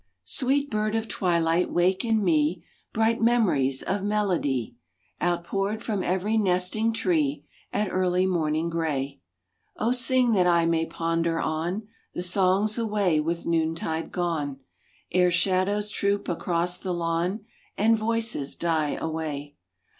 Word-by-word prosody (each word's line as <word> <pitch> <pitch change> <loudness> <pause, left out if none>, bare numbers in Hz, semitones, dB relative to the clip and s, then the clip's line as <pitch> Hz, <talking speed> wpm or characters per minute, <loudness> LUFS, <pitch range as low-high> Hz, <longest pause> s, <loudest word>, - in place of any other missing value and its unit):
Sweet 275 - 0
bird 215 0 0
of 225 0 -1
twilight 170 -2 +1
wake 185 +2 +2
in 225 -2 +1
me 165 -1 +1 0.3
Bright 225 +1 +1
memories 185 - +2
of 195 +1 -1
melody 185 - 0 0.5
Outpoured 195 +5 -1
from 210 -5 -1
every 190 +5 0
nesting 190 +3 +1
tree 155 -9 0 0.3
At 210 -2 -1
early 185 0 +1
morning 160 -3 0
gray. 145 - -2 0.6
O 225 +3 +1
sing 255 -1 +3
that 185 -4 +3
I 170 -1 +4
may 165 -1 +1
ponder 165 0 -1
on 175 +7 -2 0.3
The 175 - -2
songs 195 +4 +2
away 205 -8 +1
with 165 +2 -2
noontide 165 0 -1
gone, 150 -6 -2 0.5
Ere 180 0 +4
shadows 190 +3 +1
troop 200 -1 0
across 175 0 -1
the 185 -2 -3
lawn 175 +5 -1 0.3
And 225 +2 +4
voices 225 -9 -1
die 160 -3 0
away. 150 -3 -4
180 Hz, 130 wpm, -26 LUFS, 165-210 Hz, 0.6 s, I